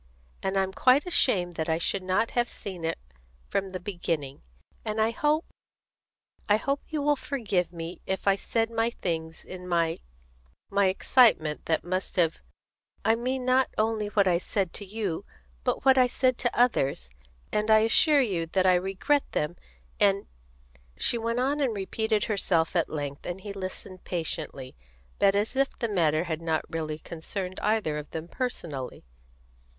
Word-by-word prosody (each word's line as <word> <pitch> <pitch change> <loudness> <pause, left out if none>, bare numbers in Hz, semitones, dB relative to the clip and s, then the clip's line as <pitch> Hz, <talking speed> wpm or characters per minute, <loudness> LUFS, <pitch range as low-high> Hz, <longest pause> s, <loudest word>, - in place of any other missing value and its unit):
And 190 0 -1
I'm 190 0 +1
quite 260 +7 +4
ashamed 185 - +2
that 160 0 -2
I 160 - +2
should 185 +3 -1
not 185 +5 +1
have 240 -1 +1
seen 185 -4 -7
it 165 0 -1 0.5
from 195 -1 -1
the 185 - -4
beginning; 165 -7 -3 0.4
and 215 0 -2
I 220 +1 +3
hope 305 +3 +1 1.0
I 210 - +6
hope 275 +5 -1
you 305 -2 -2
will 295 0 +4
forgive 210 - -1
me 170 0 -7
if 190 +1 -2
I 195 - +6
said 225 +3 -1 0.3
things 160 -2 -3
in 180 -1 -8
my 165 -2 +1 0.7
my 200 -1 +4
excitement 185 -6 +3
that 160 -1 +1
must 185 +2 -3
have 165 -3 +2 0.7
I 225 - +5
mean 250 +2 -2
not 255 +1 +3
only 215 -1 +1
what 205 -1 +2
I 175 -2 +3
said 190 -1 -2
to 205 - -6
you, 200 -4 -3 0.4
but - - -1
what 265 -1 +6
I 250 - +6
said 255 0 +1
to 240 -1 -1
others; 135 - +2 0.4
and 210 +1 0
I 220 0 +7
assure 285 +6 +5
you 180 -9 -1
that 185 +3 +1
I 185 - +6
regret 195 +11 +1
them, 150 +3 -1 0.4
and 200 -1 +3 0.4
" - - -31 0.3
She 235 - +2
went 230 +1 -1
on 275 +4 +1
and 260 -6 +1
repeated 215 +2 0
herself 185 -7 +1
at 170 - +2
length, 145 -2 -5
and 175 +2 -4
he 200 0 -6
listened 185 -1 -7
patiently, 160 -6 -4 0.4
but 195 0 +4
as 210 +5 0
if 275 0 +1
the 235 - -1
matter 165 -6 +2
had 165 -2 -3
not 160 -1 0
really 155 -2 -3
concerned 180 +4 -6
either 210 -9 +1
of 150 - -9
them 160 +1 -6
personally. 165 - -4
195 Hz, 170 wpm, -27 LUFS, 165-230 Hz, 1.0 s, I